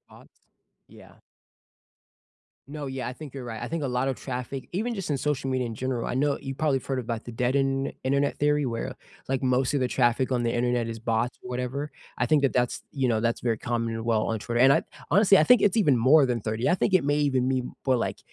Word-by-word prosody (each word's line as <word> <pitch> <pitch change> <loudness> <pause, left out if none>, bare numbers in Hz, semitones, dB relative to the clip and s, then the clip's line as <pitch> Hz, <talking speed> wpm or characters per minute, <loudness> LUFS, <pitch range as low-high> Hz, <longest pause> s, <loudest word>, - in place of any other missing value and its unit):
Bots? - - -20 0.4
Yeah. - - -16 1.5
No, 145 -1 -6
yeah. 130 -2 -4
I - - -4
think 140 0 -10
you're 130 -2 -6
right. 115 -2 -6
I 120 - -4
think 165 -2 -3
a 140 - -1
lot 125 +1 0
of 135 - 0
traffic, 130 +1 -6
even 230 +6 -1
just 190 -6 -5
in 140 - 0
social 140 -2 -1
media 130 -2 0
in 115 - -5
general 125 -1 -2
I - - -2
kno 140 +2 +1
you 135 0 -5
probably 145 -2 +1
have - - -14
heard 135 -2 -1
about 115 -2 -4
the 120 - -8
dead 125 +3 0
Internet 135 0 0
Internet 140 +2 +1
theory 150 -1 +2
where, 115 -1 -3
uh, - - -6 0.4
like, 135 0 -1
most 130 +2 +1
of 140 - +1
the 125 - +1
traffic 125 +1 +1
on 120 -2 0
the 115 - 0
Internet 120 -1 0
is 115 -1 -6
bots 115 +2 -1
or 125 - -9
whatever, 125 +4 -3 0.3
I 125 - +1
think 150 +1 +3
that 140 - +2
that's 125 -1 0
you 135 -3 0
know, 110 -2 +1
that's 115 0 0
very 115 -3 0
common 115 -1 -2
and 115 0 -5
well 110 -2 +2
on 115 - -1
Twitter. 120 +3 -2
And 135 +2 +7
I - - +3 0.3
honestly, 195 +2 +6
I - - +5
think 250 +2 +6
it's 205 0 +2
even 150 - +4
more 135 +5 +5
than 120 -3 -1
30, 110 +3 -1
I 180 - +4
think 190 - +1
it 185 - +5
may 145 +1 +2
even 130 -3 +1
mean 130 -1 -1
more, 130 -2 +3
like, 115 - -2
130 Hz, 255 wpm, -26 LUFS, 120-140 Hz, 1.5 s, And